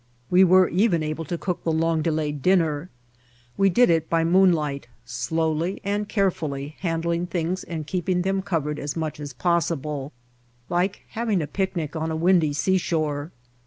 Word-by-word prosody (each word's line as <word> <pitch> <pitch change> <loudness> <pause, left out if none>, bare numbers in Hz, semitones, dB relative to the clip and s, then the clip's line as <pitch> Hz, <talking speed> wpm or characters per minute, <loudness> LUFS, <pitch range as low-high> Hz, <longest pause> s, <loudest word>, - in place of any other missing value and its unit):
We 180 +1 +7
were 185 0 +6
even 180 -4 +2
able 155 +1 -3
to 170 +4 -3
cook 180 +1 -3
the 165 - 0
long 160 0 +1
delayed 150 -2 -1
dinner. 165 -2 +2 0.7
We 195 0 +3
did 215 +2 +4
it 160 -1 +1
by 165 -1 +2
moonlight, 165 -7 +2 0.2
slowly 160 - -1
and 205 +1 -2
carefully 155 -8 -1
handling 170 0 -1
things 175 +1 -2
and 160 -3 -5
keeping 180 +2 -1
them 195 +1 0
covered 155 -6 -2
as 145 +1 -4
much 155 -2 -3
as 145 -1 -6
possible, 150 -2 -1 0.6
like 180 +3 0
having 220 -4 -1
a 155 - -1
picnic 170 -2 -3
on 160 0 -2
a 160 - -2
windy 170 -2 +3
seashore. 155 -2 0
165 Hz, 160 wpm, -24 LUFS, 150-185 Hz, 0.7 s, We